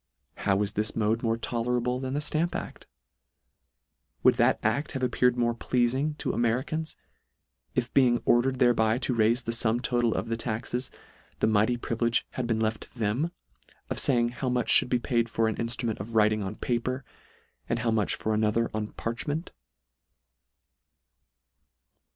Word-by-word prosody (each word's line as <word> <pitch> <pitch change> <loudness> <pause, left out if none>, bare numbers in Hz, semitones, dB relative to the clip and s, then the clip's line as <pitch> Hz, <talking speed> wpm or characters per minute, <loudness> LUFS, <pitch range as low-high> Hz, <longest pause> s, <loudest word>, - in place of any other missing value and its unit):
How 95 -1 +1
is 100 0 -3
this 105 +1 -1
mode 110 +1 +1
more 115 -1 0
tolerable 125 +1 -1
than 130 +1 -3
the 145 - 0
Stamp 155 +3 -1
act? - - -6 1.4
Would - - +7
that - - +4
act 120 +8 0
have 130 - -3
appeared 125 0 +2
more 120 -1 +2
pleafing 130 +5 0
to - - -2
A - - -4
M 120 - +2
e - - +3
r 115 - +1
i - - -3
c - - -6
a - - +1
n - - 0
s, 160 - -9 0.8
if 125 -2 -1
being 125 -3 +4
ordered 130 +2 +3
thereby 115 -2 +3
to 130 0 -1
raife 115 +1 +2
the 115 - -1
fum 115 0 +2
total 120 -2 +1
of 95 - -2
the 115 - -1
taxes, 120 +2 -3 0.5
the - - +1
mighty 110 +3 +2
privilege 115 0 0
had 125 -2 -3
been 115 -1 0
left 110 -1 -1
to - - -13
them, 115 +10 0 0.6
of - - -1
faying 120 -3 +3
how 125 +1 -3
much 125 -1 +2
fhould - - -6
be 125 - +3
paid 120 -1 0
for 115 0 +1
an 110 - -2
inftrument 115 -1 -2
of 110 +4 -7
writing 110 0 +3
on 100 +1 -4
paper, 130 +3 -2 0.6
and 115 - +1
how 120 -1 0
much 110 -2 +1
for 110 - -2
another 110 +2 +1
on 110 -1 -2
parchment 145 +8 -4
120 Hz, 185 wpm, -27 LUFS, 110-125 Hz, 1.4 s, Would